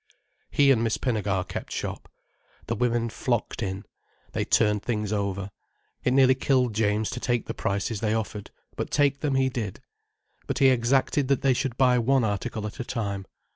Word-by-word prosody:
He 140 -1 +4
and 115 -4 +3
Miss 115 -1 0
Pinnegar 105 -7 -1
kept - - -6
shop. - - -5 0.6
The 115 - -2
women 115 0 +1
flocked 120 +1 -2
in. 95 -1 -3 0.5
They - - -1
turned 105 -2 +2
things 105 -3 -2
over. 100 -1 -2 0.5
It 125 - +2
nearly 130 0 +6
killed 130 -2 +1
James 105 0 +1
to 125 - -4
take 120 -1 0
the - - -4
prices 100 +2 -2
they 110 0 0
offered. 105 -2 -4 0.3
But - - -3
take 140 -1 +2
them 145 -3 0
he 135 0 +3
did. 115 -7 -4 0.7
But - - -2
he 135 -1 +6
exacted 130 +3 +2
that 140 -1 +1
they 135 -1 +4
should 125 -1 -2
buy 125 -2 +4
one 130 +2 +3
article 105 +1 -2
at 105 - -7
a - - -1
time. 100 -6 -3
115 Hz, 180 wpm, -26 LUFS, 105-130 Hz, 0.7 s, nearly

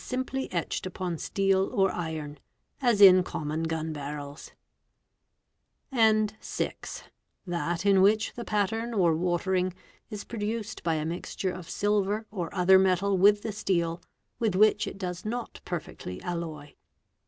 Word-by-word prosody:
3 - - -13
simply 260 +1 -3
etched 175 +1 -2
upon 180 -1 -3
steel 195 -1 +1
or 195 -1 +2
iron," 155 -4 -5 0.4
as 235 -5 +3
in 185 -2 +9
common 155 -3 -3
gun 160 -1 -2
barrels; 145 0 -7 0.8
" - - -52 0.6
and 215 -3 +3
(6) - - -5 0.4
that 175 0 -2
in 195 -2 +5
which 215 +3 +3
the 235 - -6
pattern 225 +2 -1
or 175 -5 +3
watering 180 +2 0 0.3
is 210 -1 -6
produced 220 -1 -4
by 165 -2 0
a 155 0 -2
mixture 175 +3 -3
of 180 -2 -9
silver 205 +1 0
or 180 -5 -4
other 190 0 +5
metal 190 +1 +2
with 205 +2 +5
the 220 - -2
steel, 175 -5 -1 0.4
with 220 -5 +1
which 215 +3 +4
it - - -6
does 180 -2 -5
not 235 +2 -5
perfectly 150 - -6
alloy." 160 -4 -5
190 Hz, 145 wpm, -28 LUFS, 170-210 Hz, 0.8 s, in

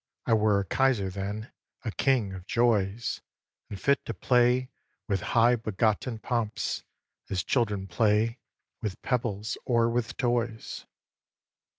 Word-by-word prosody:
I - - +2
were 105 -2 +4
a - - -5
kaiser 115 -3 +2
then, 100 +4 -5 0.3
a 110 - -1
king 120 -6 +1
of 95 0 -9
joys, 115 -2 +1 0.5
And 100 - -6
fit 140 +4 +2
to 115 - -4
play 125 +4 +3 0.4
with 100 -4 0 0.2
high 120 +2 +6
begotten 110 +2 0
pomps 115 -1 -2 0.5
As 95 -2 -1
children 105 -6 0
play 105 +5 +2 0.4
with 105 -5 -3
pebbles 115 -4 -1
or 115 -2 +2
with 120 -1 -2
toys. 120 -2 -1
110 Hz, 125 wpm, -28 LUFS, 100-120 Hz, 0.5 s, high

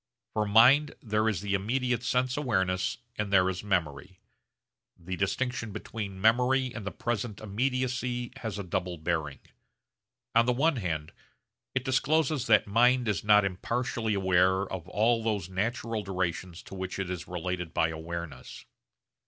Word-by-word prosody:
For 105 -1 0
mind 130 +8 +6
there 110 -1 +1
is 100 -6 -2
the 100 -1 -2
immediate 125 +5 0
sense 125 +1 0
awareness 95 -10 0 0.2
and 105 -1 -2
there 95 -2 +5
is 95 +1 -6
memory. 90 -2 -2 0.8
The 90 +2 -5
distinction 115 +4 -1
between 100 -2 -6
memory 125 +4 +3
and 110 -4 -6
the - - -2
present 115 -2 -3
immediacy 125 +2 -1
has 110 -5 -5
a 100 - -4
double 90 0 -3
bearing. 80 -3 -2 1.0
On 115 +1 +4
the 125 - +3
one 145 +3 +2
hand 80 -6 -3 0.6
it 130 -1 0
discloses 145 +1 +1
that 105 -2 +5
mind 120 +4 +3
is 105 -5 0
not 105 -1 +5
impartially 110 +3 -1
aware 95 0 +3
of 95 -3 -6
all 115 +4 +2
those 105 -6 -1
natural 115 +3 -2
durations 90 -2 -3
to - - -12
which 95 -1 -4
it 95 -2 -3
is 90 -1 -5
related 90 -1 -3
by 80 - +2
awareness. 80 -4 -7
105 Hz, 150 wpm, -29 LUFS, 90-120 Hz, 1.0 s, mind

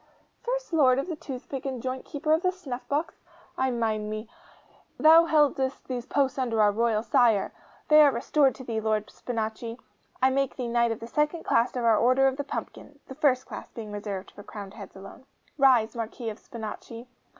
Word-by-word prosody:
'First - - -3
Lord 260 -5 +5
of 275 - -2
the 335 - -2
Toothpick 270 -2 -7
and 265 -2 -4
Joint 255 +2 -4
Keeper 305 +1 -1
of 320 - +2
the 365 -1 +2
Snuffbox? 290 -2 -4 0.3
I 260 0 +1
mind 220 -3 -1
me! 215 +1 -5 0.7
Thou 325 +2 +7
heldest 290 -4 +1
these 250 -2 -4
posts 275 -1 0
under 235 -4 0
our 210 -1 +5
royal 220 0 +1
Sire. 230 -4 +3 0.3
They 305 0 +7
are 290 -2 +7
restored 270 +3 +2
to 260 - -10
thee, 225 -3 -3
Lord 215 -1 -1
Spinachi! 230 0 -4 0.4
I 260 +1 +4
make 275 0 0
thee 250 - -4
knight 235 0 +2
of 225 - -5
the - - -5
second 300 +6 0
class 235 +3 +1
of 245 -2 -1
our 225 -2 +4
Order 255 +3 +4
of 265 0 -1
the 285 - -2
Pumpkin 290 0 -7
(the - - -9
first 265 -2 +2
class - - -8
being 220 -3 -8
reserved 205 -2 -5
for - - -12
crowned 200 -1 -9
heads 210 -3 -11
alone). 195 +7 -12 0.3
Rise, 245 -5 +4
Marquis 230 +1 -4
of 210 - -11
Spinachi! 230 0 -8
250 Hz, 195 wpm, -27 LUFS, 225-275 Hz, 0.7 s, Thou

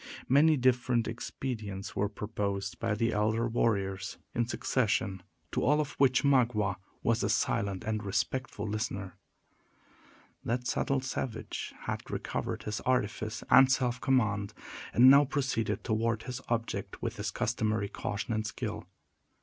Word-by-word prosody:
Many 150 +4 +5
different 125 -2 +2
expedients 110 -4 -5
were 100 0 +1
proposed 100 -3 -3
by 115 -2 0
the 115 +2 +1
elder 110 +3 +1
warriors, 100 -4 0 0.2
in 120 -1 0
succession, 105 -6 0 0.3
to - - 0
all 150 +4 +4
of 145 -1 -1
which 130 -1 +4
Magua 115 -8 +3 0.3
was - - +2
a - - 0
silent 100 -2 0
and 110 -1 -2
respectful 105 +2 -2
listener. 100 -3 -3 1.3
That 125 +1 -1
subtle 135 +1 0
savage 130 -3 -4
had - - -3
recovered - - -3
his 105 +1 -3
artifice 110 -3 -1
and 135 0 +8
self 125 -2 +1
command, 110 -7 +1 0.4
and 125 +2 +7
now 140 +2 +9
proceeded 135 -6 -1
toward 115 -1 0
his 125 0 -5
object 115 -1 -3
with - - -3
his - - -2
customary 110 -2 0
caution 105 +3 -3
and 110 0 -1
skill. - - -4
115 Hz, 135 wpm, -30 LUFS, 105-130 Hz, 1.3 s, now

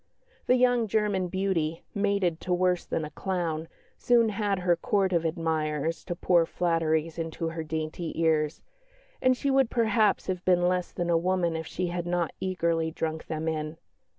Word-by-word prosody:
The 250 - +5
young 245 -2 +3
German 205 -3 +1
beauty, 175 -4 -1
mated 200 -5 0
to 180 - -1
worse 180 0 +1
than 160 - -1
a 150 - -8
clown, 165 -3 -2 0.3
soon 235 -2 +4
had 205 -1 0
her 180 -1 +2
Court 190 +1 +1
of 170 -1 +1
admirers 160 -1 -1
to 175 - -3
pour 170 -1 +3
flatteries 165 -2 0
into 165 0 -3
her 165 0 -4
dainty 160 +1 -4
ears, 155 -2 +1 0.6
and 255 0 +3
she 280 - 0
would 270 -3 +3
perhaps 220 -3 +2
have 185 -1 -3
been 175 -1 +3
less 180 0 0
than 175 -1 -2
a 165 - +4
woman 175 -1 0
if 160 -1 -4
she 185 - -2
had 175 0 -3
not 175 -2 0
eagerly 170 -3 0
drunk 160 0 -4
them 160 0 -3
in. 155 0 -2
175 Hz, 175 wpm, -28 LUFS, 160-190 Hz, 0.6 s, The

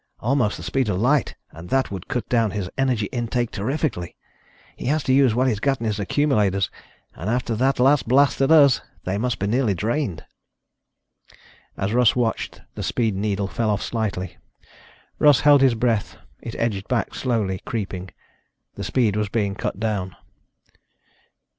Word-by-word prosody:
Almost 120 -3 +1
the - - -9
speed 130 -5 0
of 95 -2 0
light 135 +4 +2 0.2
and 80 +2 -11
that 135 -4 +1
would 95 -3 -6
cut 125 - -3
down 115 -3 +2
his 100 -3 -3
energy 130 -5 +1
intake 120 0 -1
terrifically. 115 - -2 0.6
He - - -6
has 150 +2 +1
to 130 - +1
use 130 -4 +4
what 130 +2 +2
he's 110 -5 0
got 135 +3 0
in 115 - -4
his 105 -2 -1
accumulators, 105 -5 +1 0.4
and 90 +7 -5
after 120 0 -1
that 130 +4 +1
last 135 +1 +4
blast 135 +3 +3
at 135 - +3
us, 145 -5 +6 0.2
they 95 +2 -2
must 125 0 -1
be 100 - -2
nearly 110 -1 +1
drained." 110 - -2 1.5
As 95 +3 -2
Russ 120 -2 +4
watched, 120 -3 -2
the - - -6
speed 110 -5 0
needle 100 0 -1
fell 110 +2 -1
off 105 -1 0
slightly. 105 -5 -3 0.8
Russ 145 -3 +5
held 145 -2 +6
his 130 -3 +4
breath. 115 -2 0 0.2
It 115 - -7
edged 105 -4 -2
back 125 -3 -1
slowly, 110 -7 -1
creeping. 95 -4 -4 0.6
The - - -7
speed 115 -6 +1
was 105 -1 -1
being 100 -2 0
cut 100 - -4
down. 100 -4 -2
115 Hz, 165 wpm, -23 LUFS, 100-130 Hz, 1.5 s, us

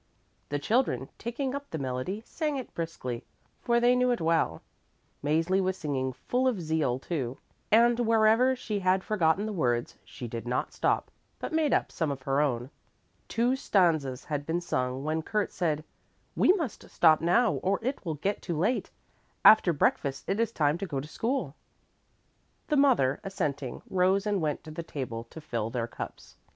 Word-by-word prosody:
The 145 - 0
children 145 - 0
taking 255 +3 -3
up 280 0 -5
the 160 - -4
melody 135 - -3
sang 300 -3 -2
it 260 - -7
briskly, 130 -8 -4 0.4
for 235 0 +2
they 245 +1 +4
knew 250 0 +3
it 245 - +1
well. 160 - +1 0.6
Mäzli 165 +6 +2
was 190 0 -1
singing 130 -3 -2
full 250 - -1
of 240 -7 +1
zeal, 155 -6 0
too, 135 -3 -3 0.3
and 235 +2 +5
wherever 225 +2 +4
she 215 -4 -3
had 185 0 +2
forgotten 195 -1 +2
the 215 - -3
words, 120 -9 0
she 125 -3 -8
did 115 +1 -6
not 125 +1 -1
stop, - - 0 0.3
but - - -5
made 315 -3 +2
up - - +1
some 160 -3 -1
of 135 -2 -4
her 135 +2 +1
own. 125 -2 -1 0.6
Two 240 +3 +1
stanzas 160 - +1
had 145 -2 -2
been 160 +3 -1
sung 130 -6 -2
when 155 +2 -1
Kurt 210 +5 -1
said, 155 -4 -1 0.5
"We - - +5
must 325 - -4
stop 160 -2 +5
now 210 +7 +4
or 195 +1 +1
it 260 +4 -2
will 165 -4 -2
get 195 +8 -2
too 170 -4 -3
late. 215 +10 0 0.6
After 215 -5 +8
breakfast 140 -2 0
it 195 +3 0
is 230 0 +1
time 150 -3 +1
to 195 - -3
go 140 -5 -2
to 140 - -6
school." 225 - -2 1.2
The 300 - +2
mother, 250 - +4
assenting, 150 -10 -3
rose 190 +2 +2
and 205 -3 0
went 150 -2 -1
to 155 - -9
the 155 - -5
table 125 -8 -5
to 140 - -11
fill 115 -8 -3
their 115 -1 -2
cups. 120 - -9
170 Hz, 180 wpm, -28 LUFS, 140-220 Hz, 1.2 s, After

